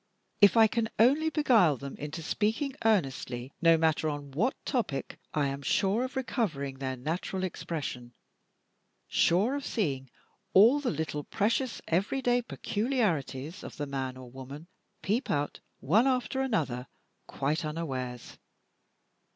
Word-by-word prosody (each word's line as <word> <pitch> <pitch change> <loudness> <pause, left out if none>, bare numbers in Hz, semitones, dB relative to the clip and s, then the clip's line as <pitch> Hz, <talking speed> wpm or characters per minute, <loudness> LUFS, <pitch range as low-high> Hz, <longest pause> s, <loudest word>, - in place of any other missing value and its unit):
If 205 +1 +7
I 225 - +8
can 225 0 0
only 285 +8 +4
beguile 230 - +4
them 140 +1 -7
into 150 +3 -6
speaking 225 - 0
earnestly, 135 - 0
no 165 -1 +6
matter 160 -1 +2
on 145 -1 -5
what 205 - +1
topic, 215 - -2
I 150 -2 +1
am 140 0 -3
sure 195 - +1
of 260 +1 -5
recovering 155 - -2
their 130 -1 -2
natural 170 +7 -3
expression; 140 -9 -5 0.9
sure 200 +10 +3
of 285 0 -3
seeing 140 - -2 0.5
all 230 +9 +7
the 280 -4 -1
little 150 -1 -3
precious 230 - -1
everyday 245 +8 +1
peculiarities 205 - -2
of - - -9
the 145 - -2
man 135 -2 -4
or 125 -2 -11
woman 135 +4 -9 0.4
peep 220 +6 0
out, 145 0 -1 0.2
one 210 - +4
after 260 0 0
another, 140 - -1 0.4
quite 150 +5 -1
unawares. 130 -6 -5
165 Hz, 135 wpm, -29 LUFS, 140-230 Hz, 0.9 s, I